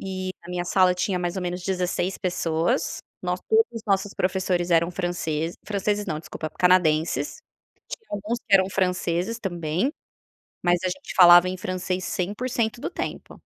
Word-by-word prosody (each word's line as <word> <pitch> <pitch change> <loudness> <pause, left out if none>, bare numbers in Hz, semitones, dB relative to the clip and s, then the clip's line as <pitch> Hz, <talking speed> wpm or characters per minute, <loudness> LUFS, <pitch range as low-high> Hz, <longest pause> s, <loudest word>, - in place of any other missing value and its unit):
E 185 -1 -4
a 175 - -9
minha 180 0 -2
sala 185 0 +4
tinha 180 +1 -1
mais 175 +1 -2
ou 190 - -2
menos 180 0 -3
16 185 0 -1
pessoas. 175 +5 0 0.2
Nós - - -2
todos 450 0 +5
os 230 - -6
nossos 195 0 +1
professores 180 -1 0
eram 170 0 +3
francês 175 -3 -2
franceses 205 0 -1
não, 155 -5 -2
desculpa, 155 0 -6
canadenses. 160 -5 +2 0.5
Tinha 445 -2 -8
alguns 210 +4 -2
que 205 - +1
eram 190 -1 +5
franceses 180 +3 0
também, 175 - -1 0.7
mas 175 0 +3
a 185 - +2
gente 285 +10 -6
falava 175 -1 +9
em 185 - -3
francês 185 0 -3
100% 225 +4 -2
do - - -3
tempo. - - -6
185 Hz, 160 wpm, -25 LUFS, 175-195 Hz, 0.7 s, falava